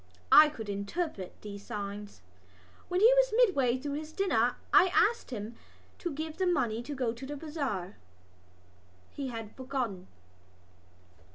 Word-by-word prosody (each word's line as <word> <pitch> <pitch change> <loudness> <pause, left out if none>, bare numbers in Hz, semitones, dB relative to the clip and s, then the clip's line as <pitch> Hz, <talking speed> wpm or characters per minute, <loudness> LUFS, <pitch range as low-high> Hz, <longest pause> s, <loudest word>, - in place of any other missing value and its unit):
I 305 0 +9
could 225 -8 -8
interpret 200 - -4
these 200 -1 -8
signs. 205 - -6 0.7
When 360 +1 0
he 465 +3 +8
was - - +4
midway 285 - +3
through 280 +2 -4
his 310 0 -9
dinner 245 - +1 0.2
I 370 - +7
asked 465 - +3
him 220 -2 -5 0.5
to 345 - -3
give 315 +3 -5
me 375 - +2
the - - +4
money 235 -8 0
to 285 +4 -6
go 250 -4 -1
to 235 - -11
the 290 +1 -5
bazaar. 275 - -4 1.1
He 280 -2 -5
had 225 -3 -7
forgotten. 255 -8 -4
260 Hz, 150 wpm, -30 LUFS, 215-315 Hz, 1.1 s, I